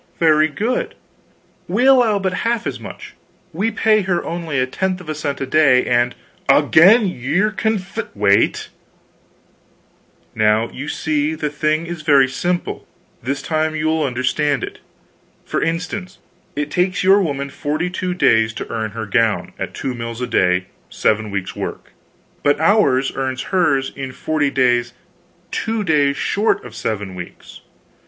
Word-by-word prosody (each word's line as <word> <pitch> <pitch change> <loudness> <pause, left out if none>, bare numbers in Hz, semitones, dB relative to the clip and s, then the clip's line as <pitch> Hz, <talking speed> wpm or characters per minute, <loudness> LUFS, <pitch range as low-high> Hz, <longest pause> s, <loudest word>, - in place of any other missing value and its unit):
"Very 155 -2 +4
good; 220 - -2 0.7
we 250 - +1
allow 250 -6 +5
but 190 -2 -1
half 230 0 0
as - - -3
much; - - -10 0.4
we 200 +8 0
pay 215 -1 +2
her 185 -3 -1
only 165 -4 -3
a 130 - +2
tenth 185 +7 -2
of 175 -3 -11
a - - -1
cent 145 -2 -3
a - - 0
day; 135 -3 +4
and 120 0 +1 0.2
" - - -21
"Again 205 +8 +6
ye're 180 - 0
conf 215 -1 -2
" - - -30
"Wait! 100 -1 +2 1.6
Now, 110 +1 +2
you 140 +3 -7
see, 150 0 -1
the 150 -2 -3
thing 155 +2 0
is 170 -1 -6
very 140 -3 +5
simple; 175 +7 -3 0.3
this 135 +3 -3
time 155 0 -1
you'll 155 +1 0
understand 135 +1 0
it. - - -6 0.7
For - - -2
instance, 180 +3 -3 0.4
it 145 0 -3
takes 180 +1 0
your 195 +2 +5
woman 140 -5 -2
42 180 +6 -2
days 110 -10 +3
to - - -6
earn 110 -1 -2
her 110 - -3
gown, 115 0 0
at - - -5
2 130 - -3
mills 115 -1 -6
a 125 - -1
day 90 -4 +1 0.2
7 110 0 0
weeks' 100 -2 -4
work; - - -6 0.5
but 145 0 +2
ours 160 -8 +3
earns 130 -1 -2
hers 140 -8 +2
in 135 -2 -6
forty 150 +1 0
days 120 -2 +1 0.6
two 225 -1 -2
days 145 -5 +2
short 210 - 0
of 120 - -10
7 105 -4 -4
weeks. 90 -1 -10
150 Hz, 155 wpm, -19 LUFS, 130-180 Hz, 1.6 s, Again